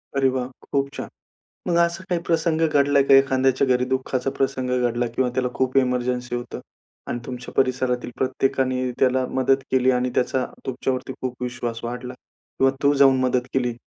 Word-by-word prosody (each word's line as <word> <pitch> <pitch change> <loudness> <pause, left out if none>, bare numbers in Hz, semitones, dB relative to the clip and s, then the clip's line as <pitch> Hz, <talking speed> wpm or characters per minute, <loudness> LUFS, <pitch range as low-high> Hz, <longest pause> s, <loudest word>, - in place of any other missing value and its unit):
अरे 135 -1 +3
वाह! 130 -1 -2 0.2
खूप 140 -1 +1
छान. - - -5 0.6
मग 170 - +2
असा 170 +2 -4
काही 175 -2 0
प्रसंग 165 -1 0
घडलाय 140 -1 +3
का? 135 - +5
एखाद्याच्या 135 0 +3
घरी 125 -1 +2
दुःखाचा 130 0 -1
प्रसंग 130 -1 -1 0.2
घडला 120 +1 -1
किंवा 130 0 +1
त्याला 130 -1 0
खूप 130 0 -1
एमर्जन्सी 125 -1 -1
होतं. 120 -1 -6 0.5
आणि 120 - -3
तुमच्या 125 -1 -7
परिसरातील 130 -2 0
प्रत्येकाने 130 -1 0
त्याला 130 0 +2
मदत 130 +1 +4
केली 130 0 +3
आणि 125 0 0
त्याचा 125 +1 +1 0.2
तुमच्यावरती 130 0 -2
खूप 125 -1 -4
विश्वास 120 -2 -4
वाढला. 125 +1 -5 0.4
किंवा 135 0 +4
तू 140 0 +5
जाऊन 135 -2 +5
मदत 125 0 0
केली. 125 -2 0
130 Hz, 165 wpm, -23 LUFS, 125-135 Hz, 0.6 s, का